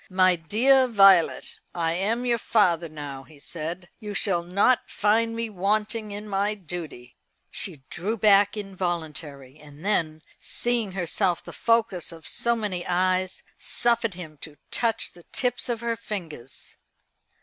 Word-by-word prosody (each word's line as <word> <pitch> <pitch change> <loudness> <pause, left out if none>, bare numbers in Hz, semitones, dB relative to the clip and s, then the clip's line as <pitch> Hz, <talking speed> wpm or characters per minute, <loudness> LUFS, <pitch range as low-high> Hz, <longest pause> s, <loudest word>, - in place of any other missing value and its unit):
"My 185 -1 +4
dear 255 +11 +4
Violet, 195 -7 +5 0.2
I 165 -1 0
am 215 +7 0
your 235 -1 +2
father 175 -8 +2
now," 145 -3 -7
he 150 +2 -17
said. 170 +4 -6
"You 210 -3 -6
shall 190 -4 +1
not 200 +8 +2
find 225 +2 +2
me 230 0 -1
wanting 210 +3 0
in 205 +1 -6
my 205 +1 0
duty." 160 -10 -8 0.3
She 155 -9 -3
drew 205 +6 -2
back 205 0 +5
involuntarily; 160 -8 -5
and 150 +3 -14
then, 160 -6 0 0.2
seeing 235 -5 -1
herself 175 -1 0
the - - -10
focus 230 -7 +1
of 165 -1 -10
so 235 0 +2
many 205 -6 -3
eyes, 185 +1 0 0.2
suffered 235 -4 +1
him 155 -5 -9
to 150 -2 -9
touch 230 -2 0
the 175 - -16
tips 245 +7 -1
of 235 -2 -2
her 235 -1 -1
fingers. 180 - -7
190 Hz, 145 wpm, -25 LUFS, 170-220 Hz, 0.3 s, Violet